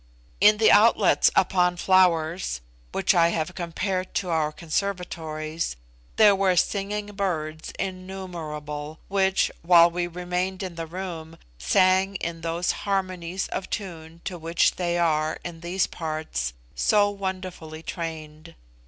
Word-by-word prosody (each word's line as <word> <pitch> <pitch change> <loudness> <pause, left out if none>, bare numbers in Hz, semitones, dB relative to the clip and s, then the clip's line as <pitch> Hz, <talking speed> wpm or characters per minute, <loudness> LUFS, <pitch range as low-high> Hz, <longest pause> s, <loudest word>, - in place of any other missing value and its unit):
In 210 +2 +6
the 220 - +5
outlets 220 +3 +5
upon 180 -2 +3
flowers 175 - +2 0.3
(which - - +2
I 170 -1 +5
have 165 +1 -2
compared 185 +2 -3
to 185 - -1
our 160 -2 +1
conservatories) 160 - -3 0.4
there 210 -2 +6
were 190 -1 +2
singing 205 +3 0
birds 160 -6 -3
innumerable, 165 -6 -6
which, 190 -1 +2
while 170 0 +6
we 175 0 -1
remained 180 +2 -3
in 185 -2 -5
the 165 -1 -6
room, 165 -2 -7 0.2
sang 190 +1 +3
in 170 -2 -4
those 170 +2 0
harmonies 185 -2 -2
of 185 - -4
tune 165 -5 -6
to 180 -3 -4
which 165 +1 +1
they 175 -1 0
are, 155 -2 +1
in 170 -2 -6
these 175 +3 0
parts, 155 - -4 0.2
so 205 -1 +3
wonderfully 185 -5 -6
trained. 160 -1 -7
175 Hz, 125 wpm, -25 LUFS, 160-190 Hz, 0.4 s, In